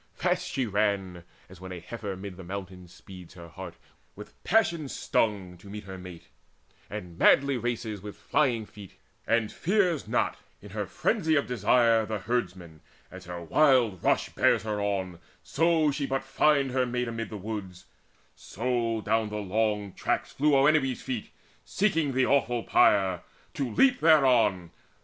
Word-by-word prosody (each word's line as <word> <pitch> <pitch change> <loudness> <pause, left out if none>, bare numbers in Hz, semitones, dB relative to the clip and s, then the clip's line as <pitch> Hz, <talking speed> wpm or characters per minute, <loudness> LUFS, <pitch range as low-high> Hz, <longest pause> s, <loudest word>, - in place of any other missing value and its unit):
Fast 180 0 -1
she 135 -2 -1
ran, 100 -4 -1 0.2
As 95 -1 -15
when 95 0 -8
a 90 - -6
heifer 105 -1 -6
'mid 95 -1 -8
the 95 - -10
mountains 90 -1 -8
speeds, 90 -2 -13
Her 85 -2 -11
heart - - -9 0.4
with - - -13
passion 170 -10 +1
stung, 95 -9 -1
to 100 - -15
meet 105 +1 -7
her 95 -1 -9
mate, 90 -2 -11 0.6
And 85 -1 -8
madly 140 0 +5
races 120 -3 -3
on 100 - -15
with 105 - -7
flying 120 -7 0
feet, 100 -2 -13 0.3
And 115 -2 +1
fears 180 -5 0
not, - - 0 0.2
in - - -13
her - - -4
frenzy 160 0 0
of 140 - +2
desire, 115 0 +3
The 110 - -2
herdman, 90 -7 -4 0.3
as 95 0 -11
her 90 -1 -7
wild 120 - +3
rush - - +2
bears - - +2
her 105 -2 -2
on, 95 -4 -2 0.2
So 160 -1 +2
she 140 0 -3
but 135 0 -2
find 135 0 +2
her 130 0 +1
mate 125 0 -2
amid 115 -1 -4
the 110 - -6
woods; 95 -3 -7 0.5
So 115 0 -2
down 110 0 0
the 105 - -5
long 105 -1 -1
tracks - - -2
flew 150 +1 +2
Oenone's 135 -2 +2
feet; 125 -5 -4 0.3
Seeking 165 -8 0
the 130 0 +2
awful 120 -4 +1
pyre, 95 -4 +3 0.3
to 135 -3 -2
leap 250 - +3
thereon. 125 - +4
110 Hz, 165 wpm, -27 LUFS, 95-135 Hz, 0.6 s, madly